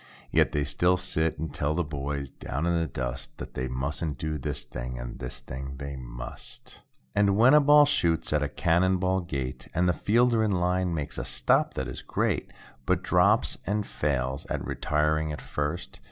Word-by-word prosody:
Yet, -, -, +4 dB
they 75 Hz, -, 0 dB
still 90 Hz, +6 st, +2 dB
sit 80 Hz, -3 st, 0 dB
and 80 Hz, +1 st, -4 dB
tell 75 Hz, +1 st, 0 dB
the 90 Hz, -, +1 dB
boys 70 Hz, -2 st, -4 dB
down 75 Hz, +6 st, -4 dB
in 85 Hz, -, +2 dB
the 85 Hz, -1 st, +1 dB
dust. 65 Hz, -1 st, -4 dB
That -, -, -8 dB
they 65 Hz, +1 st, -2 dB
mustn't 70 Hz, +3 st, -2 dB
do 80 Hz, 0 st, -3 dB
this 65 Hz, -, -3 dB
thing, 60 Hz, +1 st, -6 dB
and -, -, -7 dB
this 65 Hz, 0 st, -5 dB
thing 65 Hz, +2 st, -7 dB
they 70 Hz, 0 st, -5 dB
must. -, -, -6 dB, 0.4 s
I2I -, -, +2 dB
And 100 Hz, -1 st, +4 dB
when 120 Hz, +5 st, +7 dB
a 150 Hz, -, +8 dB
ball 145 Hz, +1 st, +7 dB
shoots 85 Hz, -, +1 dB
at 75 Hz, -, +2 dB
a 75 Hz, -, 0 dB
cannon 95 Hz, +3 st, +2 dB
ball 95 Hz, +1 st, +1 dB
gait, 70 Hz, -7 st, -4 dB
And 90 Hz, +1 st, +3 dB
the 90 Hz, -, +3 dB
fielder 115 Hz, +3 st, +3 dB
in 105 Hz, -2 st, +1 dB
line, 90 Hz, 0 st, +1 dB
makes 75 Hz, -3 st, -3 dB
a -, -, -2 dB
stop -, -, +2 dB
that 65 Hz, -, -2 dB
is 65 Hz, -, -6 dB
great. -, -, -1 dB, 0.4 s
But -, -, +2 dB
drops 100 Hz, +5 st, +4 dB
it -, -, -29 dB
and 105 Hz, +1 st, 0 dB
fails 70 Hz, -2 st, -2 dB
at -, -, -3 dB
retiring 75 Hz, 0 st, 0 dB
at 75 Hz, -, -5 dB
first. 75 Hz, +4 st, -3 dB
75 Hz, 200 wpm, -27 LUFS, 70-90 Hz, 0.4 s, a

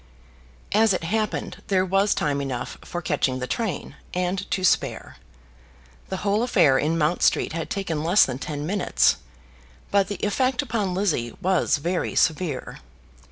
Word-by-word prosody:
As 215 Hz, 0 st, +4 dB
it 180 Hz, -, -4 dB
happened, 215 Hz, +5 st, -2 dB
there 190 Hz, -3 st, +2 dB
was 195 Hz, +2 st, +2 dB
time 140 Hz, -2 st, 0 dB
enough 130 Hz, -3 st, -4 dB
for 175 Hz, -1 st, -5 dB
catching 140 Hz, -5 st, 0 dB
the 125 Hz, -, -3 dB
train, 215 Hz, -, -3 dB, 0.2 s
and 180 Hz, +2 st, -1 dB
to 185 Hz, -, -1 dB
spare. 180 Hz, -, 0 dB, 0.9 s
The 190 Hz, -, -2 dB
whole 205 Hz, +2 st, +2 dB
affair 175 Hz, -, +4 dB
in 160 Hz, +3 st, 0 dB
Mount 160 Hz, +2 st, +1 dB
Street -, -, +2 dB
had 165 Hz, -1 st, -4 dB
taken 165 Hz, -6 st, -2 dB
less 175 Hz, +6 st, +5 dB
than 130 Hz, -1 st, -5 dB
ten 145 Hz, 0 st, -4 dB
minutes. 195 Hz, +3 st, +2 dB, 0.7 s
But 200 Hz, -1 st, +3 dB
the 205 Hz, -, -4 dB
effect 255 Hz, +6 st, +1 dB
upon 215 Hz, -7 st, -2 dB
Lizzie 160 Hz, -, 0 dB
was 185 Hz, -3 st, +2 dB
very 170 Hz, +4 st, -2 dB
severe. 155 Hz, -4 st, 0 dB
180 Hz, 155 wpm, -24 LUFS, 150-200 Hz, 0.9 s, less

